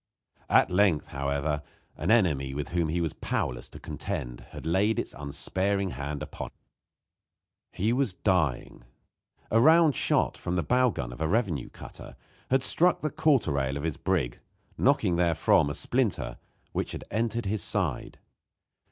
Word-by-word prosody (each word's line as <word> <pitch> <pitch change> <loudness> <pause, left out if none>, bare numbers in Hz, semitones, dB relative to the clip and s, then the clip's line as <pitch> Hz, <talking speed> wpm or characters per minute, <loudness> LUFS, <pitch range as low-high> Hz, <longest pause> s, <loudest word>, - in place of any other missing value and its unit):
At - - +4
length, 90 -4 +2
however, 70 +2 -1 0.3
an 85 - -3
enemy 75 - +2
with 75 0 -4
whom 85 -2 0
he 85 +3 0
was 80 -3 -1
powerless 60 - -3
to - - -11
contend 70 -12 -5
had - - -9
laid 100 +6 +2
its - - -2
unsparing 95 +7 -1
hand 70 0 -4
upon - - -6
him. - - -15 1.2
He 110 +5 0
was 125 -7 0
dying. 80 - 0 0.7
A 115 - +4
round 160 0 +6
shot, - - +1
from 90 - -2
the 85 - 0
bow 125 - +3
gun 60 - -5
of 65 - -10
a 80 - +1
revenue 90 - 0
cutter, - - -11 0.3
had 130 0 +3
struck 175 +5 +3
the 155 - -1
quarter 150 - +2
rail 70 0 -1
of 70 - -5
his 80 -3 -2
brig, - - -1 0.4
knocking 85 -2 +2
therefrom 85 -4 +3
a 75 - -4
splinter, 95 - -1 0.3
which - - -3
had - - -6
entered 115 +1 -1
his 100 +1 -1
side. - - -2
85 Hz, 160 wpm, -28 LUFS, 70-110 Hz, 1.2 s, round